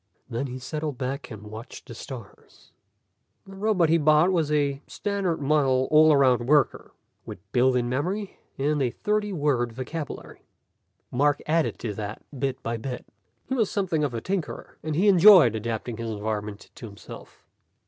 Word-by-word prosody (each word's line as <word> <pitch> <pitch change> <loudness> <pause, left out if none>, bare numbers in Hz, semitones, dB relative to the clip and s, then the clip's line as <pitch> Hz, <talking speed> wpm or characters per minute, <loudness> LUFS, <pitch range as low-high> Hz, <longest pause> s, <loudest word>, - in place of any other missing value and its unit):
Then 125 +3 -3
he 130 0 -6
settled 150 +2 -4
back 135 +2 -4
and 105 -2 -9
watched 110 +3 -9
the 120 - -8
stars. 115 -3 -11 0.7
The 195 - -12
robot 195 -5 +2
he 165 +1 +4
bought 155 +4 +4
was 160 -5 0
a 140 -2 0
standard 200 -5 -2
model 135 -3 +2
all 155 +1 +7
around 130 -4 +3
worker, 145 0 +2 0.3
with - - -8
built 125 +1 +3
in 120 -1 +1
memory 185 - -3 0.2
and 145 +1 0
a 130 - +2
thirty 210 - -1
word 140 -8 0
vocabulary. 140 +5 -7 0.7
Mark 145 +3 +2
added 160 +1 +1
to 110 -3 -4
that, 105 +1 -6 0.2
bit 135 -1 -2
by 115 0 -2
bit. 125 +2 -6 0.4
He - - -3
was 225 -6 +1
something 180 -7 -1
of 135 -5 -1
a 115 - -3
tinkerer, 185 0 -4
and 155 -1 -3
he 190 +6 +2
enjoyed 185 - +8
adapting 115 +1 -4
his 115 -1 -4
environment 105 -1 -5
to 115 - -9
himself. 100 -1 -13
140 Hz, 165 wpm, -25 LUFS, 120-165 Hz, 0.7 s, enjoyed